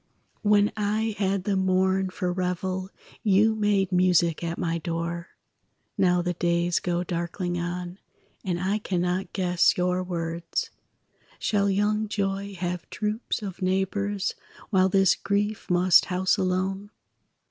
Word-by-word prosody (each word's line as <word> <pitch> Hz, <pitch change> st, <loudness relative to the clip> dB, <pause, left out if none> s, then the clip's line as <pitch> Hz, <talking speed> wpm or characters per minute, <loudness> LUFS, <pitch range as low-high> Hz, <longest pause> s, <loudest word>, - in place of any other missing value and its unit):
When 205 Hz, 0 st, +4 dB
I 215 Hz, +1 st, 0 dB
had 195 Hz, -1 st, 0 dB
the 200 Hz, 0 st, 0 dB
morn 190 Hz, 0 st, +2 dB
for 180 Hz, -1 st, -2 dB
revel, 185 Hz, +1 st, -2 dB, 0.3 s
You 215 Hz, +2 st, +4 dB
made 205 Hz, -3 st, +1 dB
music 180 Hz, -2 st, +3 dB
at 170 Hz, 0 st, -3 dB
my 170 Hz, -1 st, -1 dB
door; 170 Hz, +1 st, -3 dB, 0.7 s
Now 180 Hz, -2 st, +3 dB
the 180 Hz, 0 st, -1 dB
days 170 Hz, 0 st, +1 dB
go 175 Hz, 0 st, -1 dB
darkling 175 Hz, 0 st, -3 dB
on, 175 Hz, +2 st, -4 dB, 0.4 s
And 180 Hz, -3 st, -1 dB
I 195 Hz, +4 st, 0 dB
cannot 180 Hz, -1 st, -1 dB
guess 180 Hz, -3 st, +2 dB
your 180 Hz, 0 st, +1 dB
words. 170 Hz, -2 st, -3 dB, 0.7 s
Shall 200 Hz, -1 st, +1 dB
young 210 Hz, +2 st, +1 dB
joy 200 Hz, -1 st, -2 dB
have 180 Hz, -1 st, -4 dB
troops 215 Hz, +1 st, -3 dB
of 190 Hz, -2 st, -6 dB
neighbors, 195 Hz, +2 st, 0 dB, 0.4 s
While 190 Hz, -2 st, +4 dB
this 195 Hz, -1 st, +4 dB
grief 205 Hz, +1 st, -2 dB
must 180 Hz, 0 st, +5 dB
house 185 Hz, 0 st, +1 dB
alone? 190 Hz, +2 st, -1 dB
185 Hz, 130 wpm, -26 LUFS, 175-200 Hz, 0.7 s, must